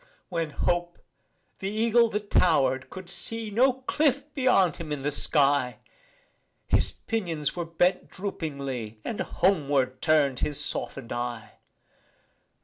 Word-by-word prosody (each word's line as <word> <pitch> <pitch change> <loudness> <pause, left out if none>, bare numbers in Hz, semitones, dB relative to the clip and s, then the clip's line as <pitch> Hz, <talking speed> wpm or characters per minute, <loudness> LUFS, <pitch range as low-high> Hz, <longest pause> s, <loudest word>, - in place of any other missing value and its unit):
When 165 -3 -1
Hope, 175 +3 -1 0.6
the 195 - -2
eagle 230 +2 +3
that 210 -1 -4
tower'd, 135 -6 +3
could 185 -1 -9
see 225 +3 -5
No 250 +6 +4
cliff 285 +1 +1
beyond 220 - +3
him 160 -3 -7
in 145 -2 -3
the 145 - 0
sky, 140 -4 +2 0.9
His - - +3
pinions 170 -10 -3
were 175 -1 -3
bent 170 +3 +1
droopingly 140 - -5
And 220 - -4
homeward 140 -8 +1
turn'd 145 -5 +3
his 150 -1 -2
soften'd 135 -3 -3
eye. 120 -2 -5
165 Hz, 125 wpm, -27 LUFS, 140-205 Hz, 0.9 s, No